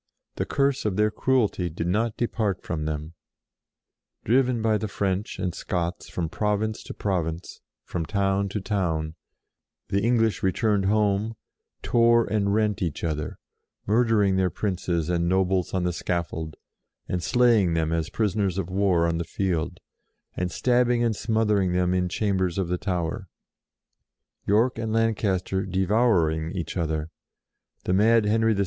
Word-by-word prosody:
The - - -2
curse 140 -1 +1
of 105 -3 -1
their 105 +1 +2
cruelty 110 -8 +1
did 80 +1 -4
not 105 +5 0
depart 110 -5 -1
from 75 -2 -3
them. 75 +1 -4 1.1
Driven 125 +1 +3
by 110 -1 +1
the 110 - -2
French 100 0 -2
and 90 -2 -2
Scots 85 0 -3
from 85 -2 -2
province 105 +4 -1
to - - -8
province, 85 -4 -3 0.2
and - - -49
from 85 -2 -2
town 100 -1 0
to 105 - -3
town, 85 -6 -1 0.8
the 100 +1 +1
English 115 -1 +2
returned 100 +1 +1
home, 105 +1 +1 0.5
tore 115 0 +4
and 100 -2 0
rent 105 -2 +1
each 85 -5 -3
other; 75 -3 -3 0.5
murdering 105 -3 +3
their 95 -1 +2
princes 90 -3 -2
and 85 -1 0
nobles 95 -1 +1
on 95 -2 -1
the 90 0 0
scaffold, 80 -3 -3 0.5
and 90 - -2
slaying 110 -4 +3
them 80 -1 0
as 80 -1 -1
prisoners 100 -3 0
of 95 -2 -3
war 95 -3 +2
on 85 0 -1
the - - -1
field; 85 -1 -2 0.6
and 90 0 -2
stab 125 -1 +2
bing 120 -1 +2
and 115 -2 +1
smothering 105 -4 +1
them 90 0 +1
in 90 -1 +1
chambers 95 -2 0
of 95 -3 -1
the 90 - 0
Tower; 95 0 -2 1.2
York 115 +4 +2
and 110 -1 -2
Lancaster 100 -4 0
devour 95 +2 +2
HER 80 - +1
END 80 - -2
113 - - -4
ing 90 - -6
each 85 - -5
other; 80 -2 -2 0.7
the 90 - 0
mad 110 +3 +4
Henry 110 +1 +2
VI. - - -3
95 Hz, 160 wpm, -25 LUFS, 90-110 Hz, 1.2 s, tore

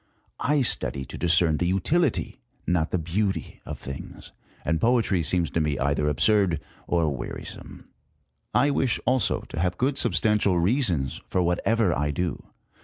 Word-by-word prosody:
I 145 -1 +2
study 70 - +1
to - - -8
discern 85 -2 +3
the 90 - 0
utility, 130 - 0 0.3
not 85 -2 +1
the - - 0
beauty 95 +5 -2
of - - -5
things, 70 0 -9 0.3
and 80 +1 0
poetry 115 -6 +2
seems 85 +1 0
to - - 0
me 75 -3 0
either 70 +2 +1
absurd 90 +2 +2 0.3
or 80 -4 +1
wearisome. 60 - -8 0.6
I 145 - +3
wish, 135 -4 +1
also, 130 0 +1
to - - -7
have 90 +1 0
good 135 +2 +1
substantial 105 -4 +2
reasons 90 - 0
for 90 - +1
whatever 90 +3 +1
I 75 +1 0
do. 85 +3 -2
90 Hz, 150 wpm, -25 LUFS, 80-110 Hz, 0.6 s, discern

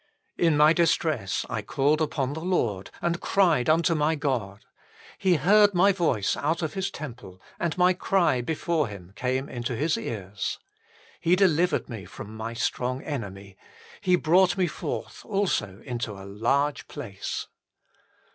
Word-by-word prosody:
" - - -46
In 150 - +2
my 150 +2 +6
distress 155 - +1
I - - -3
called 145 +3 +1
upon 145 -3 -1
the 160 - -5
Lord, 115 - 0
And 170 0 0
cried 165 -9 +3
unto 165 +2 +3
my 155 0 +2
God: 125 -9 -3 0.5
He 190 -3 +3
heard 200 +6 +5
my 195 +3 +5
voice 160 - +1
out 160 +4 -1
of 155 - -2
His 195 0 -2
temple, 120 - -9 0.2
And 170 0 -1
my 180 0 +5
cry 175 -8 +2
before 160 +2 0
Him 95 -3 -10
came 130 +4 -1
into 120 0 -4
His 155 +7 0
ears. 100 -2 -4 0.6
He 170 +2 +3
delivered 180 -2 +2
me 110 -6 -7
from 110 +1 -9
my 115 +1 -5
strong 125 +2 -2
enemy, 100 -9 -6 0.4
He 180 -1 +4
brought 180 +3 +3
me 185 - +3
forth - - -5
also 150 - -1
into 120 -4 -3
a 95 -1 -10
large 130 +9 0
place." 105 -10 -5
145 Hz, 155 wpm, -26 LUFS, 115-170 Hz, 0.6 s, my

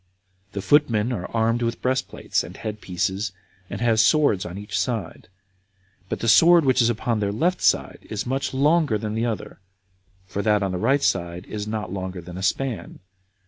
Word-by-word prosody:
The 100 - -4
footmen 120 -2 +3
are 90 -6 -4
armed 115 +1 +1
with 115 0 -1
breastplates 130 +1 -1
and - - -10
head 105 -1 -6
pieces, 95 +3 -2 0.4
and 100 - -6
have 115 -2 +3
swords 120 -5 +3
on 90 +2 -7
each 105 +1 -6
side; 115 -9 -3 0.8
but - - -3
the 115 - -1
sword 165 +7 +6
which 130 -1 +4
is 115 - +3
upon 115 0 -1
their 100 -1 0
left 170 - 0
side - - +1
is 110 +1 -3
much 135 +2 -2
longer 145 -2 +2
than 105 0 -4
the 115 +2 0
other, 110 -2 -5 0.7
for 95 +2 -4
that 105 -1 +2
on 95 - -1
the 90 - -3
right 135 +6 +2
side 85 0 -1
is 105 -1 -5
not 105 -4 -4
longer 95 -1 -4
than 85 +1 -10
a 95 - -6
span. 120 +5 -2
110 Hz, 185 wpm, -23 LUFS, 100-125 Hz, 0.8 s, sword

